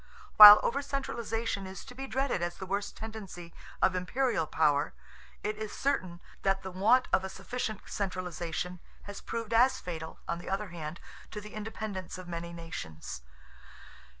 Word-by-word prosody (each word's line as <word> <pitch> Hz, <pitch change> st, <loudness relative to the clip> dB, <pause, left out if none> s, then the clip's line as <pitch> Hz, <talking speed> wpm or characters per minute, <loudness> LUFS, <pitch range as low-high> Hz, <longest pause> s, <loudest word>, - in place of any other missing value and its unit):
While 210 Hz, 0 st, +13 dB
over 280 Hz, +4 st, 0 dB
centralization 230 Hz, -7 st, -3 dB
is 190 Hz, 0 st, -9 dB
to 250 Hz, -, -11 dB
be 270 Hz, +2 st, -6 dB
dreaded 265 Hz, -8 st, -1 dB
as 175 Hz, 0 st, -2 dB
the 190 Hz, -, -6 dB
worst 200 Hz, +2 st, -3 dB
tendency 200 Hz, -6 st, -8 dB, 0.3 s
of 185 Hz, -, +5 dB
imperial 185 Hz, +1 st, 0 dB
power, 145 Hz, -2 st, +2 dB, 0.5 s
it 210 Hz, +1 st, -2 dB
is 215 Hz, -1 st, -5 dB
certain 185 Hz, -11 st, -1 dB, 0.2 s
that 195 Hz, 0 st, +1 dB
the 190 Hz, -, -5 dB
want 215 Hz, +8 st, +4 dB
of 185 Hz, -, +4 dB
a 190 Hz, -, -4 dB
sufficient 215 Hz, +2 st, -4 dB
centralization 180 Hz, -2 st, -4 dB, 0.2 s
has 205 Hz, -1 st, -8 dB
proved 230 Hz, -1 st, -4 dB
as 255 Hz, +3 st, +4 dB
fatal, 160 Hz, -2 st, -6 dB
on 170 Hz, -, -2 dB
the -, -, -8 dB
other 195 Hz, +1 st, -2 dB
hand, 165 Hz, -1 st, -6 dB, 0.3 s
to 210 Hz, -, -6 dB
the 210 Hz, +1 st, -11 dB
independence 215 Hz, -4 st, -5 dB
of 185 Hz, -1 st, -9 dB
many 170 Hz, 0 st, -5 dB
nations. 80 Hz, -, -7 dB
195 Hz, 160 wpm, -30 LUFS, 175-225 Hz, 0.5 s, While